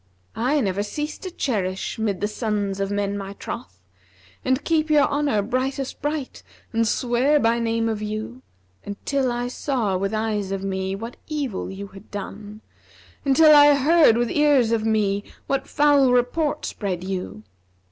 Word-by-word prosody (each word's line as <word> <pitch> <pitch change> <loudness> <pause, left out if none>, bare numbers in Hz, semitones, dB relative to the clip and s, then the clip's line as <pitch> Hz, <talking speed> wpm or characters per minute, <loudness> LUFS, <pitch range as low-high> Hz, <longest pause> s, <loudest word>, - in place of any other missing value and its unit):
I 260 +6 +1
never 195 -3 0
ceased 295 +8 -4
to 375 - -5
cherish 205 - -2
mid 205 -4 -1
the 205 - +1
sons 210 -3 -2
of 195 0 -1
men 205 0 -1
my 195 0 -5
troth, 95 - -8 0.4
* 95 0 -29
And 260 +2 +1
keep 315 -1 +1
your 300 -2 +5
honour 285 -8 0
brightest 260 +4 -2
bright 295 -2 -3 0.3
and 230 0 +2
swear 250 +6 +2
by 230 -1 +2
name 230 0 0
of 220 -2 -2
you 215 +4 -5 0.4
Until 255 +6 -2
I 240 0 -2
saw 245 -6 -1
with 195 +2 -2
eyes 215 -3 -1
of 195 0 -3
me 190 0 -2
what 230 +4 -7
evil 285 -10 -3
you 190 +1 -7
had 195 +2 -14
done; 205 +1 -7 0.3
* - - -26
Until 300 +3 +7
I 290 0 +8
heard 290 -3 +5
with 240 -1 0
ears 285 -6 +3
of 225 -2 +1
me 205 -2 +1 0.2
what 275 -1 -1
foul 285 -3 +4
report 250 +5 +1
spread 185 -4 -3
you. 185 - -5
225 Hz, 165 wpm, -23 LUFS, 200-275 Hz, 0.4 s, I